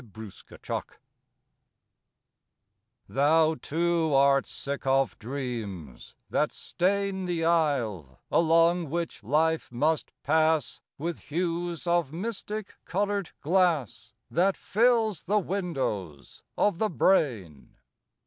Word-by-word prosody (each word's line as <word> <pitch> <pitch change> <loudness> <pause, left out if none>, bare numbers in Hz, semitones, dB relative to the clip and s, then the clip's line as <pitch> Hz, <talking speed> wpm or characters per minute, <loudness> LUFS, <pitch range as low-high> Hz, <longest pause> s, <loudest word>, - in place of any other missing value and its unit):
PAUSE 110 -3 -10 2.6
Thou 155 +4 +3
too 165 0 0
art 140 0 +4
sick 140 -1 -5
of 135 -1 +2
dreams, 110 - -6 0.2
that - - +1
stain 195 +1 -1
The 170 -2 -1
aisle, 120 - 0
along 165 0 +3
which 170 +2 -3
life 155 +7 +1
must 150 +5 0
pass, 155 -1 +1 0.2
With 170 +3 -4
hues 170 +1 -2
of 170 -5 +1
mystic 210 +3 -5
colored 200 0 -1
glass, 155 - +1 0.2
That 185 +9 +2
fills 225 -4 +2
the 210 +4 +2
windows 135 - -3 0.2
of 205 -5 +2
the 220 - +1
brain. 110 - 0
160 Hz, 95 wpm, -27 LUFS, 135-180 Hz, 2.6 s, art